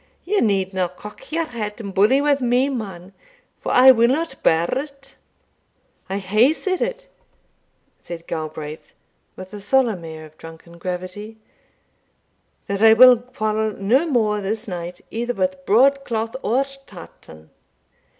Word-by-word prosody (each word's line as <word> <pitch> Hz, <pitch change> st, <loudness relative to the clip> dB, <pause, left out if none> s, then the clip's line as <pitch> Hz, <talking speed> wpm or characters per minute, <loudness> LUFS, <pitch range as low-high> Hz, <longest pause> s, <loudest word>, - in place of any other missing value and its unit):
Ye 405 Hz, +3 st, +1 dB
needna 190 Hz, -3 st, 0 dB
cock 210 Hz, -, -13 dB
your 330 Hz, +1 st, 0 dB
hat 215 Hz, -5 st, -6 dB
and 200 Hz, -3 st, -7 dB
bully 215 Hz, +9 st, +4 dB
wi' 290 Hz, 0 st, +3 dB
me, 250 Hz, +2 st, +2 dB
man, 195 Hz, -7 st, -6 dB, 0.5 s
for -, -, -4 dB
I 260 Hz, +1 st, +8 dB
will 235 Hz, -2 st, +4 dB
not 280 Hz, +2 st, -2 dB
bear 165 Hz, +1 st, +3 dB
it." 275 Hz, -1 st, -10 dB, 0.9 s
"I 195 Hz, -, -2 dB
hae 215 Hz, +9 st, +3 dB
said 370 Hz, +3 st, -3 dB
it," -, -, -3 dB, 0.9 s
said 170 Hz, -1 st, -9 dB
Galbraith, 155 Hz, -1 st, -7 dB, 0.4 s
with 185 Hz, +2 st, -11 dB
a 205 Hz, -, -8 dB
solemn 225 Hz, -4 st, +1 dB
air 160 Hz, -1 st, -9 dB
of 155 Hz, 0 st, -19 dB
drunken 165 Hz, +1 st, -13 dB
gravity, 185 Hz, +5 st, -6 dB, 1.3 s
"that 200 Hz, 0 st, -3 dB
I 220 Hz, 0 st, +8 dB
will 250 Hz, +2 st, +8 dB
quarrel 220 Hz, -3 st, -2 dB
no 240 Hz, -, +1 dB
more 215 Hz, -7 st, +1 dB
this 215 Hz, +4 st, -4 dB
night 175 Hz, -2 st, -6 dB
either 240 Hz, +2 st, -3 dB
with 185 Hz, -1 st, -2 dB
broadcloth 235 Hz, -1 st, +2 dB
or 260 Hz, +5 st, +1 dB, 0.2 s
tartan. 80 Hz, -, -14 dB
215 Hz, 140 wpm, -21 LUFS, 185-255 Hz, 1.3 s, I